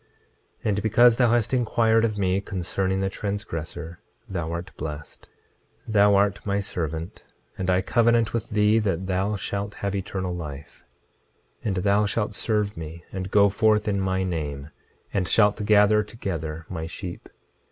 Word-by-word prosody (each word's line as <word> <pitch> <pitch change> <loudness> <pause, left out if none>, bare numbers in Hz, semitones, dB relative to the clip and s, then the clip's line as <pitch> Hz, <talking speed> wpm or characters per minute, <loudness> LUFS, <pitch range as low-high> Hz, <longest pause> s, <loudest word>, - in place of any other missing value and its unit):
26:19 - - -37 0.6
And 105 0 0
because 115 +2 +5
thou 120 -2 +4
hast 120 0 +1
inquired 115 -2 +3
of 110 -2 0
me 95 0 +1
concerning 95 0 -2
the 95 - 0
transgressor, 85 -5 -5 0.3
thou 85 -4 -3
art 85 +3 -6
blessed. 75 0 -7 0.6
26:20 110 - -6
Thou 100 -1 +5
art 100 0 +2
my 100 0 0
servant; 80 -3 -4 0.3
and 95 - -3
I 90 0 +3
covenant 115 +1 +3
with 115 -1 -2
thee 105 +1 +3
that 95 -4 -1
thou 95 +3 0
shalt 100 +1 -4
have 100 0 -3
eternal 95 -2 -3
life; 75 -4 -8 0.8
and 100 -4 -1
thou 100 +3 +2
shalt 105 +1 -1
serve 105 -1 -1
me 80 +1 -8
and 95 0 -4
go 100 0 +5
forth 105 +1 +2
in 100 -2 +1
my 95 0 0
name, 75 -5 -4 0.4
and 95 -3 0
shalt 105 +1 +3
gather 105 0 +5
together 80 -7 -5
my 80 -3 -5
sheep. 90 +1 -7
100 Hz, 160 wpm, -25 LUFS, 90-105 Hz, 0.8 s, because